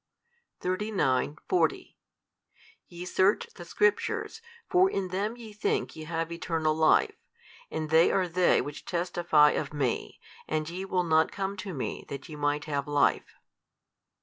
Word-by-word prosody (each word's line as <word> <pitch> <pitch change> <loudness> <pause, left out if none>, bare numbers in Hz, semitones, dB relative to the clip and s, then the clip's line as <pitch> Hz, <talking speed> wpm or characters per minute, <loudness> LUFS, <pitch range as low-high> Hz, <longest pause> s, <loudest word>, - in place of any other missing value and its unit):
|301 185 -8 0
39,40 370 - 0 0.9
Ye 175 0 -8
search 190 +2 +2
the 175 - -10
Scriptures, 210 - 0 0.3
for 370 +1 +4
in 195 - -2
them 205 +6 -2
YE 225 -3 -10
think 210 - -1
ye 160 -1 -8
have 165 +1 -3
eternal 165 -2 -1
life, 160 0 +3 0.6
and 155 -1 -4
they 160 +1 +5
are 185 -2 +1
they 175 +1 +3
which 145 0 -7
testify 170 -4 +3
of 150 -1 -3
Me, 125 - -2 0.3
and 155 +1 -2
ye 185 +2 -5
will 185 -2 0
not 160 -1 +3
come 195 0 -3
to 190 0 -5
Me 130 - -4
that 140 +3 -7
ye 155 - -8
might 145 0 -1
have 145 -1 -2
life. 145 -1 +1
170 Hz, 150 wpm, -28 LUFS, 150-190 Hz, 0.9 s, they